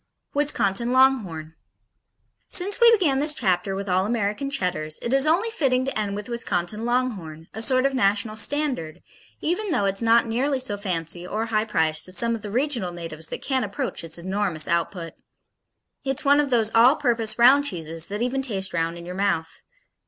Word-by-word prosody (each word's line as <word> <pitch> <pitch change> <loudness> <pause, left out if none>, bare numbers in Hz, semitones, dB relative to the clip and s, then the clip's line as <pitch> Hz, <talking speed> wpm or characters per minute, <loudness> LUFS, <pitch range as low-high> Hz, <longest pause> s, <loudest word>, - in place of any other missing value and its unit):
'" - - -52
Wisconsin 235 -5 +1
Longhorn 215 -13 +2 0.9
Since 400 +6 -1
we 470 0 +8
began 335 -12 +2
this 300 +1 +2
chapter 190 -2 0
with 200 +1 -5
all 185 0 +2
American 225 +4 -1
Cheddars, 175 - -2
it 235 - -1
is 275 +2 +3
only 380 +9 +2
fitting 260 -10 +1
to 270 - -3
end 205 -2 -2
with 205 0 -6
Wisconsin 215 -3 -2
Longhorn, 200 -11 -2
a 220 - -6
sort 255 +2 +2
of 275 - +1
national 210 -2 +1
standard, 225 - 0 0.4
even 360 +6 -1
though 255 - +1
it's 195 +1 -1
not 230 0 +4
nearly 260 +5 0
so 255 -5 -2
fancy 175 -3 -2
or 220 +4 -2
high 220 -1 0
priced 160 -7 +1
as 185 - 0
some 235 0 +2
of 225 - -4
the 210 - -6
regional 240 -5 -1
natives 165 -2 -6
that - - -7
can't 265 -2 0
approach 200 -4 -4
its 165 0 -2
enormous 185 -3 -2
output. 170 0 -2 0.9
It's 270 0 -2
one 285 +1 +5
of 290 -2 +1
those 225 -3 +1
all 240 +5 +6
purpose 235 -7 -1
round 265 +4 +6
cheeses 165 - -3
that 205 +3 -3
even 260 +2 -1
taste 195 -7 -3
round 165 0 -1
in 170 - -10
your 180 - -6
mouth. 190 -4 -2
220 Hz, 190 wpm, -24 LUFS, 180-265 Hz, 0.9 s, we